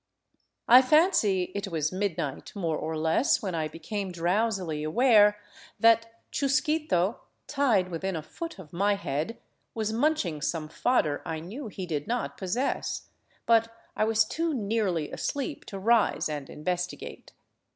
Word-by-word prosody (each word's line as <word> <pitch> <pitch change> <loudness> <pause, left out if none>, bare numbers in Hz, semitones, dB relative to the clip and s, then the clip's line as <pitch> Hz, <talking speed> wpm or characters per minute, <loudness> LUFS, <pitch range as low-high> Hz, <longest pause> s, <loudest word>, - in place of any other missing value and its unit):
I 250 +2 +9
fancy 255 - +3
it 200 0 -3
was 155 -4 -1
midnight, 175 -7 -3
more 170 -6 -1
or 160 +1 -3
less, 160 - +2
when 190 -3 -2
I 160 -2 -1
became 190 +5 -5
drowsily 180 -2 0
aware 210 +4 +5 0.4
that 230 0 +3
Chusquito, 280 - +1 0.3
tied 240 -11 +2
within 185 +3 -3
a 160 - -4
foot 330 - -7
of 175 -5 -12
my 200 +3 +2
head, 165 +3 -3 0.4
was 220 -1 -1
munching 225 - 0
some 155 0 -2
fodder 155 - +1
I 160 - -4
knew 220 - -7
he 190 -3 -6
did 155 -2 -3
not 240 +2 -2
possess; 205 +8 -2 0.4
but 230 0 +4 0.2
I - - +1
was 220 0 +3
too 325 +6 -1
nearly 200 - -1
asleep 285 +1 -3
to 195 - -7
rise 225 +3 +2
and 150 -3 -5
investigate. 180 +3 -4
200 Hz, 140 wpm, -28 LUFS, 165-230 Hz, 0.4 s, I